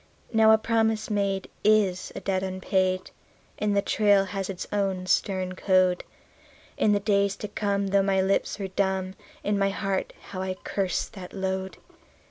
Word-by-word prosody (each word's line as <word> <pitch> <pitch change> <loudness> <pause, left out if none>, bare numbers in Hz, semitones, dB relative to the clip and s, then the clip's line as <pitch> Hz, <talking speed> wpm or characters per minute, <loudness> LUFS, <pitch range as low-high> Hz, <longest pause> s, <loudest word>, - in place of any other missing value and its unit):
Now 220 0 +6
a 220 - +7
promise 220 -1 0
made 200 -2 0 0.2
is 205 -4 +2
a - - -5
debt 190 -1 0
unpaid, 185 0 -1 0.5
and 205 -1 +1
the 200 - +2
trail 205 -2 +3
has 195 0 -4
its 185 -2 -4
own 195 -3 0
stern 185 0 0
code. 185 -1 +2 0.7
In 210 - +2
the 205 - +3
days 200 -1 +1
to 210 - -6
come, 200 -1 -1
though 200 0 +4
my 195 0 +2
lips 190 +1 +1
were 195 -2 -4
dumb, 190 -1 -1 0.3
in 205 -1 0
my 195 0 +3
heart 195 -1 -2 0.2
how 185 -1 -4
I 190 0 -2
cursed 190 -1 -2
that 185 -4 -9
load. 190 -1 -3
195 Hz, 165 wpm, -26 LUFS, 190-205 Hz, 0.7 s, a